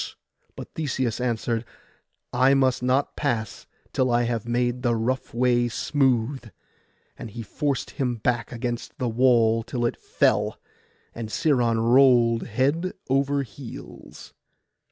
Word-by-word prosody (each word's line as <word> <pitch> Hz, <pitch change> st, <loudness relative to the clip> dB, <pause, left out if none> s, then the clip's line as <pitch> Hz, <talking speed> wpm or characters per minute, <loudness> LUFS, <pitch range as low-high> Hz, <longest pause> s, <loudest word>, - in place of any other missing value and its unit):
But -, -, -9 dB
Theseus 130 Hz, -6 st, -2 dB
answered, 115 Hz, -1 st, -1 dB, 0.7 s
'I 130 Hz, +2 st, +4 dB
must 130 Hz, -2 st, +2 dB
not 130 Hz, +3 st, +1 dB
pass 115 Hz, -8 st, -2 dB, 0.3 s
till 130 Hz, -1 st, +1 dB
I 120 Hz, 0 st, +2 dB
have 115 Hz, -1 st, -2 dB
made 120 Hz, +1 st, 0 dB
the 120 Hz, -1 st, +1 dB
rough 125 Hz, +4 st, -2 dB
way 120 Hz, 0 st, +2 dB
smooth;' 130 Hz, -1 st, 0 dB, 0.7 s
and 115 Hz, -, -7 dB
he 115 Hz, +2 st, -7 dB
forced 140 Hz, +5 st, -2 dB
him 125 Hz, -4 st, -1 dB
back 115 Hz, 0 st, -1 dB
against 120 Hz, 0 st, -4 dB
the 125 Hz, -, -1 dB
wall 115 Hz, -1 st, +3 dB
till 120 Hz, +1 st, -3 dB
it 120 Hz, -, 0 dB
fell, -, -, +1 dB, 0.5 s
and 115 Hz, -2 st, -6 dB
Sciron 120 Hz, -5 st, +1 dB
rolled 120 Hz, -4 st, +5 dB
head 140 Hz, -, 0 dB, 0.2 s
over 140 Hz, +1 st, +2 dB
heels. 115 Hz, -, -11 dB
120 Hz, 130 wpm, -25 LUFS, 115-130 Hz, 0.7 s, rolled